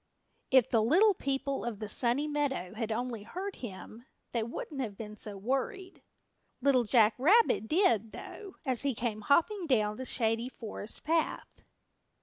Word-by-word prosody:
If 260 -3 +5
the 225 - +2
Little 370 - +5
People 275 -3 -2
of 235 -3 -3
the 215 +1 -5
Sunny 245 +7 +1
Meadow 280 -11 -2
had 225 0 -3
only 235 -1 -3
heard 370 - -6
him 230 +2 -9 0.2
they 235 - 0
wouldn't 260 +5 -5
have 210 -6 -5
been 215 -1 -7
so 210 -1 -4
worried. 270 - -3 0.6
Little 260 -2 +3
Jack 220 -1 +5
Rabbit 360 - +4
did, 235 - +2
though, 400 -3 -9
as 255 -4 +1
he 275 -3 0
came 220 -2 -3
hopping 340 - +2
down 215 -6 +2
the 260 - -5
Shady 230 -1 0
Forest 225 -3 -6
Path. 325 +1 -1
245 Hz, 155 wpm, -31 LUFS, 220-290 Hz, 0.6 s, If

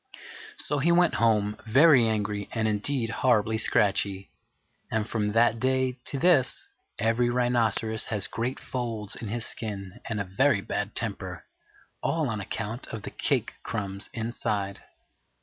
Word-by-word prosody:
So 145 0 -2
he 165 +6 +3
went 175 0 +4
home, 105 -2 +2
very 135 0 +6
angry 105 -2 -2
indeed 110 +3 0
and - - -5
horribly 110 -3 +3
scratchy; 100 -2 +1 0.6
and 110 -1 -1
from 105 -3 -1
that 115 0 +3
day 130 0 +1
to 140 - -1
this 160 -4 +2 0.3
every 115 +3 +2
rhinoceros 115 -3 +2
has 105 -4 -2
great 120 +4 -3
folds 115 -5 -4
in 115 - -7
his 115 +3 -1
skin 100 -1 -5
and 110 -2 -2
a - - 0
very 100 +5 +2
bad 105 +1 -3
temper, 95 -6 -2 0.6
all 160 -5 0
on 110 -2 -3
account 110 +5 -5
of 110 -3 -7
the - - -6
cake - - 0
crumbs 100 -3 -4
inside. 105 -4 -3
110 Hz, 145 wpm, -27 LUFS, 105-125 Hz, 0.6 s, very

